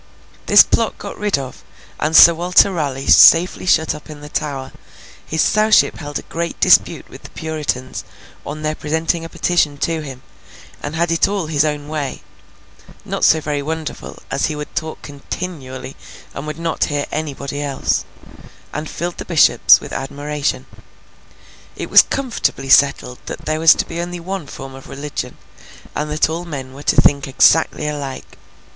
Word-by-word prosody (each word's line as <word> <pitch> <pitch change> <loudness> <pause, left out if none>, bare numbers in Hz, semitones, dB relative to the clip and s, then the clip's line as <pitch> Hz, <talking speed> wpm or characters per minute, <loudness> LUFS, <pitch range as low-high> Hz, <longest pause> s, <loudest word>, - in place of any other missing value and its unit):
This - - +8
plot - - -1
got - - -8
rid 210 -4 0
of, 130 -2 -8 0.4
and 155 +1 -1
Sir 170 - +9
Walter 180 +4 +3
Raleigh 140 -6 -3
safely 175 +2 +6
shut 160 -3 +3
up 150 - -12
in 150 -1 -10
the 150 - -10
Tower, 135 -3 -4 0.5
his 160 - 0
Sowship 215 +1 +3
held 145 -2 -5
a - - -7
great 170 +1 -5
dispute - - +3
with - - -13
the - - -12
Puritans 155 -5 -4 0.4
on 155 +1 -7
their 155 0 0
presenting 160 +2 -2
a 165 - -7
petition 160 -6 0
to 165 +2 -2
him, 135 -4 -9 0.6
and 145 +2 -5
had 170 +1 0
it 165 - +3
all 200 -4 -2
his 155 -2 +1
own 150 -1 -3
way—not 150 -3 -8
so 160 - +5
very 145 -2 -3
wonderful, 160 +1 -6
as 135 - 0
he 155 - -4
would 150 0 -7
talk 160 0 -5
continually, 140 -3 -7 0.4
and 140 +2 -7
would 155 0 -5
not 165 -1 -1
hear 145 -1 -2
anybody 145 -2 -4
else—and 145 +2 -5
filled 175 0 -5
the - - -4
Bishops 165 -4 +5
with - - -10
admiration. 145 +2 -3 1.1
It - - -7
was - - +10
comfortably 235 - -2
settled 135 -2 +3
that - - -7
there 155 0 -1
was 165 0 +7
to - - -2
be 170 +1 -5
only 175 0 -5
one 185 -2 -5
form 135 0 -9
of 135 0 -12
religion, 145 +1 -6 0.6
and 150 0 -3
that 150 +1 +1
all 165 +2 -4
men 135 -5 -7
were 140 - -11
to - - +2
think 140 -1 +3
exactly 150 +3 +3
alike. 140 -3 -6
150 Hz, 165 wpm, -18 LUFS, 140-165 Hz, 1.1 s, was